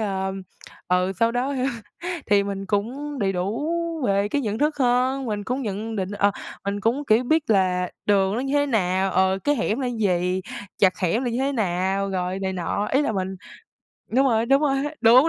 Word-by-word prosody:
ờm, 190 -2 -2 0.5
ừ, 180 +1 +2
sau 230 0 +3
đó 255 +3 -1 0.7
thì 200 -1 +4
mình 195 -1 -4
cũng 260 +9 -2
đầy 195 -4 +1
đủ 200 - -2 0.4
về 200 +1 +2
cái 285 - 0
nhận 215 -1 -2
thức 300 +2 +1
hơn, 255 +1 +2
mình 210 -2 -3
cũng 255 +4 -2
nhận 220 +1 -4
định, 190 -1 -2
ờ, 205 0 +2 0.3
mình 200 +1 -2
cũng, 240 +8 0
kiểu, 220 +3 +4
biết 310 0 +1
là 180 -3 +2 0.2
đường 195 -1 +3
nó 240 - -1
như 270 +2 -2
thế 285 0 +3
nào, 190 -6 +1
ờ, 190 +1 +2
cái 290 0 +3
hẻm 230 +1 0
là 260 - -1
gì, 185 -5 0 0.4
chặt 185 -2 +3
hẻm 195 +8 0
là 245 - 0
như 235 - -2
thế 275 +2 0
nào, 195 -3 0
rồi 185 0 -2
này 190 0 -1
nọ. 190 +3 -2
Ý 275 - +4
là 285 - 0
mình 190 -2 -1 0.8
đúng 270 +2 +4
rồi, 230 -2 +2
đúng 275 +4 +4
rồi, 275 -2 +2 0.2
đúng, 250 +6 +7
210 Hz, 200 wpm, -24 LUFS, 190-255 Hz, 0.8 s, đúng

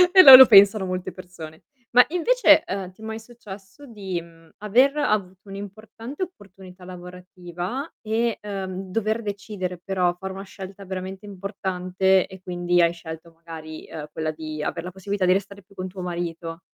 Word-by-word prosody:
E 370 - +10
lo 270 - +13
lo 260 0 +11
pensano 200 -2 +6
molte 185 0 -4
persone. 165 -4 -12 0.3
Ma 250 +1 +7
invece, 360 +2 +4
ehm, 190 -1 -5
ti 185 - -21
è 220 - -9
mai 220 0 -5
successo 215 0 -13
di, 195 -8 -5
mhmm, 165 -1 -19
aver 255 +8 +3
avuto 200 -8 -2
un'importante 215 - -8
opportunità 190 - -12
lavorativa 180 - -7
e, 225 +1 -1
ehm, 190 -2 -6
dover 220 +2 -1
decidere 200 -3 -5
però 185 -2 0
fare 190 0 -6
una 195 +1 -8
scelta 195 0 -10
veramente 190 +1 -7
importante 190 -1 -1
e 190 -1 -13
quindi 175 -1 0
hai 170 0 +3
scelto 165 0 -10
magari, 160 -1 -10
ehm, 150 -1 -8
quella 155 0 -3
di 155 -1 -7
aver - - -4
la 180 - -7
possibilità 195 +1 -3
di 180 - +4
restare 200 +1 -4
più 200 +1 -24
con 185 - -5
tuo 185 0 -9
marito? 170 -1 -5
190 Hz, 170 wpm, -23 LUFS, 180-210 Hz, 0.3 s, lo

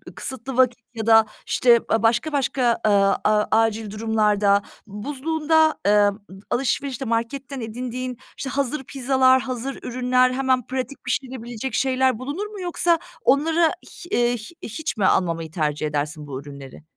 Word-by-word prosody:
kısıtlı 260 0 -5
vakit 250 -1 +3
ya 225 -2 -4
da, 225 -1 +6 0.2
işte, 240 -2 +4
a 225 - +1
başka 235 +7 +2
başka, 260 -4 +1
aaa, 200 -2 +4
a 210 0 +3
acil 225 -1 +1
durumlarda, 210 -2 +2 0.3
buzluğunda, 310 +8 +1
ııı, 205 0 +4 0.3
alışverişte 270 0 -1
marketten 245 +3 -3
edindiğin, 250 +2 -5 0.2
işte, 270 - -4
hazır 280 +1 -1
pizzalar, 260 0 +3
hazır 260 0 -4
ürünler, 255 +1 +2
hemen 260 -2 +1
pratik 260 +1 -5
pişirebilecek 245 -2 -4
şeyler 260 -2 +1
bulunur 290 +11 -4
mu? 415 -3 -9
Yoksa 345 -1 +1 0.3
onlara 320 +5 +4
hi 345 +1 -8
eee, 240 -5 +2
hi 215 - -10 0.2
hiç 300 +2 -4
mi 200 - +1
almamayı 165 -4 +1
tercih 155 -2 -1
edersin 150 +1 -3
bu 135 -1 -6
ürünleri? 140 0 -11
245 Hz, 140 wpm, -23 LUFS, 215-270 Hz, 0.3 s, da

